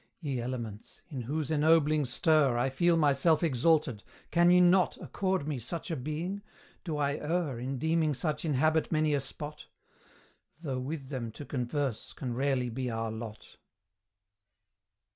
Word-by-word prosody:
Ye 140 -7 -2
Elements! 115 -4 -6
in 135 -6 -5
whose 145 +5 -3
ennobling 155 -1 +4
stir 140 0 +3
I 130 +2 +1
feel 170 +5 +3
myself 150 +2 +3
exalted 150 -4 +2 0.3
can 175 0 +5
ye 180 0 +7
not 180 +1 +4
Accord 190 -6 -2
me 145 -4 -2
such 170 - -5
a - - 0
being? 160 +8 -4 0.4
Do 160 -4 -3
I 140 0 0
err 150 -5 -1
In 130 +2 -3
deeming 160 +1 +1
such 150 +2 -2
inhabit 155 +1 +2
many 155 -2 +2
a 145 - +2
spot? 145 +2 -7 1.0
Though 135 -5 -2
with 135 +1 -5
them 125 -5 -4
to 145 - -8
converse 130 -2 -3
can 125 -3 -4
rarely 130 -1 0
be 125 +1 -3
our 115 -1 -2
lot. 110 -1 -8
145 Hz, 150 wpm, -30 LUFS, 130-160 Hz, 1.0 s, ye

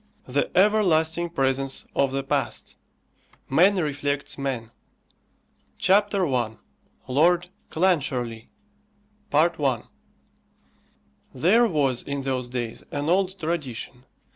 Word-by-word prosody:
THE 135 +3 0
EVERLASTING 175 -5 +3
PRESENCE 135 -3 -1
OF 140 -1 +1
THE 135 0 -2
PAST: 135 - -2 0.7
MAN 180 +9 +4
REFLECTS 145 -4 -2
MAN. 130 -5 -4 1.1
CHAPTER 200 0 +3
I. 120 -6 -1 0.5
LORD 170 +6 +3 0.2
CLANCHARLIE. 130 -10 0 0.8
I. 150 -5 +2 1.5
There 205 - +4
was, 140 - +1
in 140 -1 -4
those 130 -2 -2
days, 120 -2 -4
an 145 +2 -2
old 190 +1 +1
tradition. 135 -6 -4
145 Hz, 90 wpm, -25 LUFS, 130-175 Hz, 1.5 s, MAN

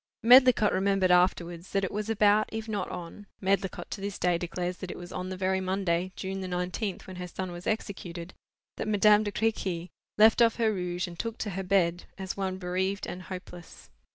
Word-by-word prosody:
Medlicott 245 -3 +7
remembered 195 -1 +2
afterwards 180 -1 +2
that 195 -1 +1
it 190 - -1
was 210 +1 -3
about, 215 -1 +3
if 220 0 -5
not 205 -4 -2
on—Medlicott 190 +2 -3
to 200 - -5
this 200 0 -4
day 180 -1 +2
declares 175 +1 -3
that 185 - -7
it - - -6
was 175 0 -9
on 185 0 -4
the 185 - -5
very 190 0 0
Monday, 185 -1 0
June 190 0 -4
the 185 - -4
nineteenth, 180 +3 -3
when 185 -1 -9
her 180 0 -5
son 185 +1 -5
was 175 0 -8
executed, 185 -5 -4 0.4
that - - -3
Madame 210 0 +5
de 210 -1 -2
Crequy 190 -6 -1 0.3
left 220 +2 +6
off 230 -1 +5
her 225 -2 +1
rouge 180 -1 -2
and 170 -1 -10
took 230 -1 -3
to 210 - -3
her 195 +1 -3
bed, 180 -2 +1
as 190 -1 -4
one 190 -1 -2
bereaved 190 +2 -2
and 180 - -6
hopeless. 180 -2 -10
190 Hz, 200 wpm, -28 LUFS, 180-205 Hz, 0.4 s, Medlicott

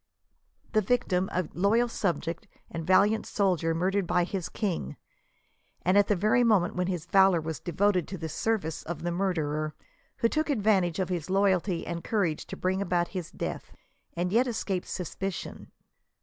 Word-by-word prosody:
The 215 - +3
victim 190 -4 +1
;^a 180 -3 -1
loyal 215 +6 +3
subject 170 -7 -2 0.2
and 165 -1 -5
valiant 205 +4 +4
soldier 175 -5 +1
murdered 190 +2 0
by 175 - +2
15 - - -13
his 185 -3 -3
king, 175 - -3 0.9
and 185 +2 +3
at 205 0 +5
the 205 - +3
very 215 +6 +3
moment 210 -7 +3
when 180 0 0
his 180 -3 -3
valor 190 -2 +5
was 160 0 -4
devoted 185 -1 +1
to 190 - -6
the 160 -1 -4
service 165 -1 -1
of 165 -1 -6
the 175 - -1
murderer, 155 -5 -1 0.4
who 230 - +3
took 310 +5 -1
advantage 200 - +2
of 185 -2 -1
his 175 -2 -3
loy 195 +1 +4
alty 180 -1 -1
and 170 -1 -4
courage 190 -8 -1
to - - -7
bring 190 +1 0
about 175 -3 0
his 180 -4 -5
death, - - -5 0.4
and 175 +1 -1
yet 245 +3 +4
escape 200 -6 -2
sus 180 - -5
picion. 195 -1 -5
185 Hz, 175 wpm, -28 LUFS, 170-205 Hz, 0.9 s, at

